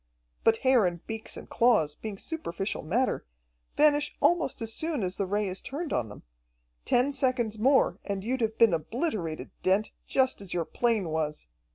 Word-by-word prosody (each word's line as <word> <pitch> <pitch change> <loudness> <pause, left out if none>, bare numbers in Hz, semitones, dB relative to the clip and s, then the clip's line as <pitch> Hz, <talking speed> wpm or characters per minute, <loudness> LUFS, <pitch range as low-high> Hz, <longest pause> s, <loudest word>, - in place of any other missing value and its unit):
But 225 0 +4
hair 250 -7 +5
and 170 -1 -5
beaks 220 0 -6
and - - -9
claws, 215 -11 +3
being 210 +4 -7
superficial 195 - -4
matter, 235 +12 0 0.5
vanish 295 -1 +3
almost 345 -6 +2
as 225 -1 -4
soon 315 -6 -2
as 185 0 -2
the 195 - -1
Ray 205 +1 0
is 185 0 -4
turned 300 +3 -4
on 110 -3 0
them. 105 - -11 0.6
Ten 250 +4 +3
seconds 250 -6 0
more, 265 +4 +3
and 200 -1 -3
you'd 250 +3 -1
have 220 -1 0
been 230 -5 +6
obliterated, 170 - -2
Dent, 195 +3 +2 0.2
just 260 -5 +1
as 190 -3 -5
your 170 -2 0
plane 225 -6 0
was. 155 - -2
220 Hz, 175 wpm, -28 LUFS, 185-260 Hz, 0.6 s, been